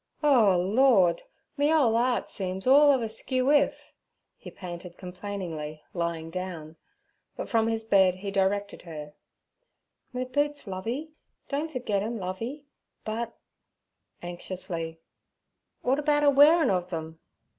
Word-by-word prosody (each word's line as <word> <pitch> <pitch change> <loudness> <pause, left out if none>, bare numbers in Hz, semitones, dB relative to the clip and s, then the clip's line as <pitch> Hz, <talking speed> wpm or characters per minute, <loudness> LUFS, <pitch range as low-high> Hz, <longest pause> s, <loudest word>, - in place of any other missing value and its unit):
'O 230 -11 +5
Lord! 195 -1 +4 0.4
me 290 +2 +3
ole 270 -8 +4
'eart 245 +1 +1
seems 190 -1 -4
all 285 +3 +7
of 260 -4 +2
a - - -1
skewwif' 260 +6 +1 0.4
he - - -11
panted 175 -1 -9
complainingly, 180 -5 -6
lying 170 -2 -3
down; 170 -3 -6 0.6
but - - -4
from 225 -2 +2
his 225 0 -1
bed 190 -4 +4
he 195 +2 -5
directed 200 +1 0
her: 150 -3 -9 1.0
'Me 250 0 -2
boots, 290 +3 -1
Lovey—don't 280 +8 -5
forget 215 -7 -1
'em, 225 +3 -3
Lovey; 225 +10 -5 0.4
but'—anxiously—'w'at 185 - -7
about 295 0 +2
a 290 - +6
wearin' 300 +3 +6
ov 180 -1 -1
them?' 160 -2 -6
205 Hz, 115 wpm, -27 LUFS, 180-260 Hz, 1.0 s, all